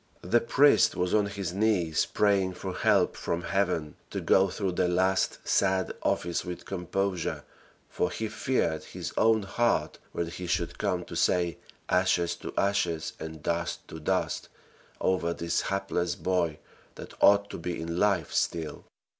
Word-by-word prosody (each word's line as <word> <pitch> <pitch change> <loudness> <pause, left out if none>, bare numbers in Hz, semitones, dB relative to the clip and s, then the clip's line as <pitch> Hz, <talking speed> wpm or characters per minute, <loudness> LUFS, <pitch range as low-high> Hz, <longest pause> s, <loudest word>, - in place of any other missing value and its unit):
The 115 +7 +3
priest 125 -3 +4
was 90 0 0
on 105 -1 +3
his 100 -3 -4
knees, 95 -6 +1
praying 100 -3 +2
for - - -5
help - - +2
from 85 +1 -3
heaven 90 -7 -1
to - - -3
go 95 0 +4
through 95 0 -2
the 90 - +1
last 95 +2 +1
sad 95 -1 +2
office 85 -1 0
with 90 -1 -7
composure, 95 -1 -2 0.4
for 90 - -1
he 110 - -3
feared 85 - -1
his - - -6
own 110 -1 +3
heart 120 +4 0
when 85 - -2
he 85 +2 -6
should 85 0 -1
come 90 -4 -1
to - - -8
say 90 -2 +1 0.3
"ashes 90 -2 +2
to - - -7
ashes" 90 -5 0
and 80 -1 -7
"dust 85 0 -2
to 80 - -7
dust" 75 - -1 0.5
over 85 -2 0
this 85 0 -1
hapless 95 -3 -1
boy, 85 -4 0 0.4
that - - -10
ought 100 0 +5
to - - -6
be 85 +1 -4
in 85 +1 -3
life 100 -6 +1
still. 80 -2 -1
90 Hz, 155 wpm, -28 LUFS, 85-100 Hz, 0.5 s, ought